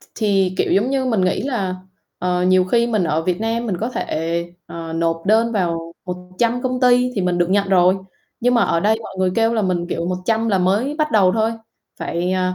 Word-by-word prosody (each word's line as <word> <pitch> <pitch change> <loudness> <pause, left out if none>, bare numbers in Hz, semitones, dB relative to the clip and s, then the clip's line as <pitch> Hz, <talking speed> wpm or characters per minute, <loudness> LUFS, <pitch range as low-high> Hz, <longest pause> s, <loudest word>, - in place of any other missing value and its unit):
ch - - -20
thì, 195 -4 +1
kiểu, - - +1
giống 215 +7 +2
như 270 -1 0
mình 230 -6 +1
nghĩ 185 0 +1
là, 210 -9 -2 0.4
ờ, 180 0 0
nhiều 185 0 +4
khi 235 +5 +2
mình 215 -6 0
ở 160 0 0
Việt 180 +2 -1
Nam 230 +1 -1
mình 195 -5 -1
có 225 - -1
thể, 170 -5 -2 0.2
ờ, 165 -1 -7
nộp 165 0 -1
đơn 225 +3 +3
vào 170 -5 -2
một 180 0 -3 0.2
trăm 240 +1 +1
công 255 -1 -2
ty 250 0 +4
thì 200 - -1
mình 180 -1 0
được 175 0 +1
nhận 200 0 +2
rồi, 185 0 +4 0.4
nhưng 245 +1 +2
mà 235 - +4
ở 165 - +1
đây 215 +4 +2
mọi 195 - -9
người 185 -1 +2
kêu 225 0 +2
là 220 - +1
mình, 180 -2 -1
kiểu, 170 -1 -2
100 220 +5 -1
là 195 -3 +2
mới 205 +10 +1
bắt 305 -3 0
đầu 195 -4 +4
thôi, 225 0 +1 0.5
phải, 175 +2 -2
à, 185 0 0
195 Hz, 235 wpm, -20 LUFS, 180-230 Hz, 0.5 s, nhiều